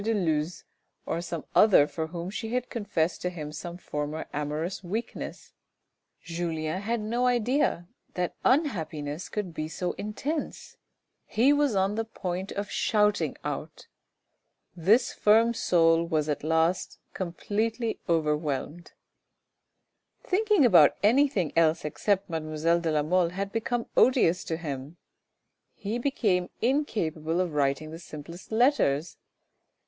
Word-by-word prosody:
de 225 +1 +1
Luz, 160 -3 -1 0.4
or 170 - -2
some 170 -2 -5
other 200 -9 +6
for 160 +1 -4
whom 170 +2 -6
she 225 +2 -4
had 250 0 -2
confessed 195 -7 -1
to 180 - -1
him 155 -4 -7
some 170 +3 -7
former 150 -2 -4
amorous 150 +6 -3
weakness! 215 +7 -5 0.7
Julien 165 0 -3
had 230 +3 -1
no 235 +4 0
idea 245 - +1 0.3
that 180 -1 -1
unhappiness 165 - 0
could 200 -5 -4
be 155 -1 -3
so 175 +3 -3
intense; 280 +9 -4 0.5
he 255 +6 +4
was 290 -6 +2
on 195 +1 +2
the 225 +1 -1
point 190 -4 -5
of 200 0 -4
shouting 210 -1 +1
out. - - -5 0.9
This 205 +9 +3
firm 225 +3 +4
soul 165 -6 +3
was 155 -2 0
at 150 -2 -2
last 160 +3 +1 0.2
completely 220 +6 -2
overwhelmed. 150 0 -1 1.3
Thinking 410 - +3
about 170 -10 +7
anything 235 - +3
else 165 -1 +3
except 195 +6 0
mademoiselle 160 +1 0
de 170 -1 -1
la 150 -1 +1
Mole 175 +2 +2
had 195 +3 -4
become 235 +1 -1
odious 205 -9 +4
to 160 - -2
him; 145 -1 -6 0.8
he 215 +4 -3
became 210 -9 0
incapable 175 - 0
of 180 -4 -1
writing 145 +2 0
the 165 - -8
simplest 170 +3 -10
letters. 220 - +2
180 Hz, 130 wpm, -27 LUFS, 160-220 Hz, 1.3 s, about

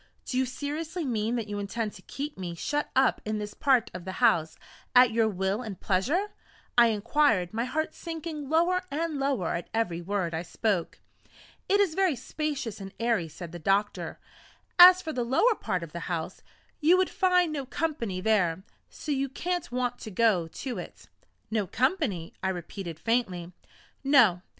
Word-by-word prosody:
"Do - - -4
you 260 0 +2
seriously 305 +6 -4
mean 230 -2 0
that 230 -3 -2
you 205 0 -4
intend 210 +2 -3
to - - -12
keep 290 +2 -6
me 175 -3 -5
shut 295 - -2
up 265 0 +3
in 215 0 -2
this 210 0 -5
part 265 -4 +2
of 180 -1 -7
the 190 +1 -5
house, 200 -10 +2 0.4
at 250 -1 +7
your 225 0 +3
will 195 +2 -1
and 215 -7 -7
pleasure?" 290 - 0 0.4
I 240 -1 +7
inquired, 220 -3 +2
my 230 +2 -1
heart 315 +4 -2
sinking 320 -4 -6
lower 345 +4 +3
and 310 0 -2
lower 270 -11 0
at 170 - -4
every 175 -7 0
word 185 -2 -2
I 160 - -1
spoke. 185 0 -1 0.7
"It 400 - +4
is 390 -6 +3
very 375 -4 +2
spacious 265 -4 -4
and 195 0 -7
airy," 230 -7 +1
said 170 +1 -9
the 175 - -7
doctor; 200 +5 0 0.6
"as 365 +1 +10
for 315 - -4
the 245 - -1
lower 270 - +3
part 185 - -3
of 165 - -8
the 170 - -5
house, 165 -2 -3 0.4
you 330 +4 +5
would 370 0 +1
find 360 -4 +3
no 275 -3 -4
company 255 - -2
there, 190 -4 +2 0.3
so 305 - -6
you 275 -1 0
can't 350 +2 -3
want 245 0 -1
to 220 - -7
go 200 -5 +2
to 250 +9 -5
it." - - -10 0.4
"No 215 -3 0
company!" 250 - 0
I 190 - 0
repeated 175 -2 -6
faintly. 190 -7 -1 0.5
"No. 245 -11 +5
235 Hz, 180 wpm, -28 LUFS, 190-295 Hz, 0.7 s, as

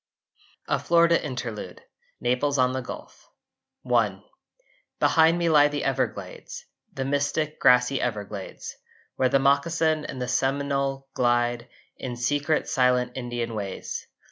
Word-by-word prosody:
A - - +1
FLORIDA 170 0 +3
INTERLUDE 120 - -6 0.4
(Naples 125 +4 0
on 130 0 +3
the 130 - -2
Gulf) 125 - -10 0.6
I - - +2 0.8
Behind 165 +1 +4
me 170 -1 0
lie 150 -2 +6
the 145 0 -3
Everglades, 135 -1 -3 0.3
The 135 - -4
mystic 145 +2 -1
grassy 125 +1 +4
Everglades, 105 -4 -5 0.4
Where 130 -1 +3
the 135 - +4
moccasin 155 +3 +2
and 130 - -6
the 125 - -3
Seminole 135 +1 -1
glide 120 0 +1 0.3
In 125 -2 -5
secret 145 +5 0
silent 125 -3 +2
Indian 120 -2 -4
ways. 100 -3 -5
135 Hz, 120 wpm, -25 LUFS, 120-145 Hz, 0.8 s, lie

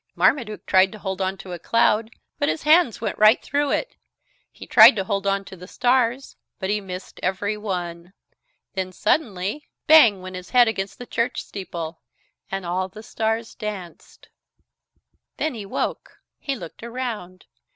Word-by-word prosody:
Marmaduke 230 -7 +1
tried 190 0 +4
to - - -8
hold 190 -2 -4
on 190 +1 -1
to 190 0 -10
a 175 - -6
cloud, 225 -1 +2 0.3
but 285 - +1
his - - -2
hands 305 - +4
went 230 - -3
right 215 +2 +6
through 285 0 0
it. - - -2 0.5
He - - -11
tried 225 +2 +8
to 195 - -1
hold 200 0 -2
on 195 0 0
to 190 - -10
the 180 0 -12
stars, 250 +1 +1 0.2
but 190 -1 -2
he 210 0 0
missed 185 -1 -8
every 195 +3 -1
one. 180 -4 -5 0.6
Then 185 -1 -3
suddenly 210 - -1 0.2
bang 240 -11 +7
went 185 0 -7
his 180 0 -8
head 245 -1 +5
against 195 -3 -3
the 245 - -8
church 235 +1 -2
steeple 170 -4 -7 0.5
and 195 -1 -4
all 185 +2 -1
the 210 +4 -12
stars 225 -1 -2
danced 200 -5 -8 1.1
Then 315 - -1
he 210 -4 -7
woke. - - -4 0.2
He 275 - -3
looked 170 -9 -10
around. 230 -7 -6
205 Hz, 165 wpm, -23 LUFS, 185-235 Hz, 1.1 s, tried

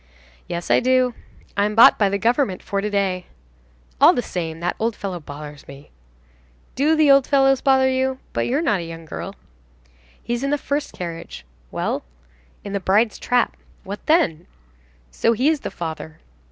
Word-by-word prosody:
"Yes, 170 0 -4
I - - +6
do." 255 0 +2 0.4
"I'm 205 +1 +1
bought 230 - +7
by 200 -2 +3
the 200 - 0
government 230 -2 0
for 200 0 -2
to 210 - -2
day." 190 -3 -1 0.7
"All - - +8
the 245 - -1
same, 165 -2 -4
that 175 +1 -2
old 225 0 0
fellow 190 -3 -5
bothers 145 -1 -10
me." 140 +1 -13 0.8
"Do 295 +5 +2
the 310 -2 +5
old 275 -1 +5
fellows 270 -2 +3
bother 265 -1 +4
you? 260 0 0 0.2
But - - -1
you're 280 +6 0
not 210 - +1
a - - -4
young 165 0 -9
girl." - - -7 0.9
"He's 240 +2 -2
in 275 - 0
the 290 - +1
first 285 +1 -3
carriage." 165 - -7 0.2
"Well?" - - -2 0.6
"In 200 - -6
the 200 - 0
bride's 205 +4 +2
trap." 245 -2 +1 0.3
"What 200 +2 -7
then?" 180 - +2 0.6
"So 230 - +2
he 255 +6 +2
is 315 -2 +1
the - - -5
father." 160 -1 -7
210 Hz, 175 wpm, -21 LUFS, 175-265 Hz, 0.9 s, All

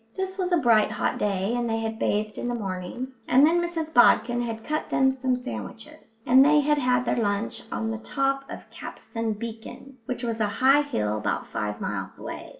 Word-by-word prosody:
This 380 0 -3
was 370 -2 -2
a 350 - +4
bright 230 -7 +4
hot - - -1
day, 200 +1 0
and 240 -1 -1
they 225 - 0
had 225 0 -4
bathed 210 +1 -1
in - - -3
the 245 - -1
morning, 195 +4 -5 0.2
and 265 +3 +6
then 340 +2 +3
Mrs 330 -2 -3
Bodkin 240 -1 +5
had 225 -2 -4
cut 305 +4 -3
them 265 0 +3
some 260 -1 0
sandwiches, 250 -1 -9
and 260 +2 +7
they 300 +1 +5
had 295 +1 +2
had 250 -1 +2
their - - 0
lunch 205 +1 -2
on 225 -1 -2
the 225 - -4
top 275 +3 -1
of - - -9
Capstan 225 -1 -5
Beacon, 235 +4 -9
which 250 0 -4
was 230 -1 -2
a 215 - +2
high 270 +3 +5
hill 105 - -1
about - - -2
five 105 0 -4
miles 95 -1 -4
away. - - -7
240 Hz, 205 wpm, -25 LUFS, 220-275 Hz, 0.2 s, and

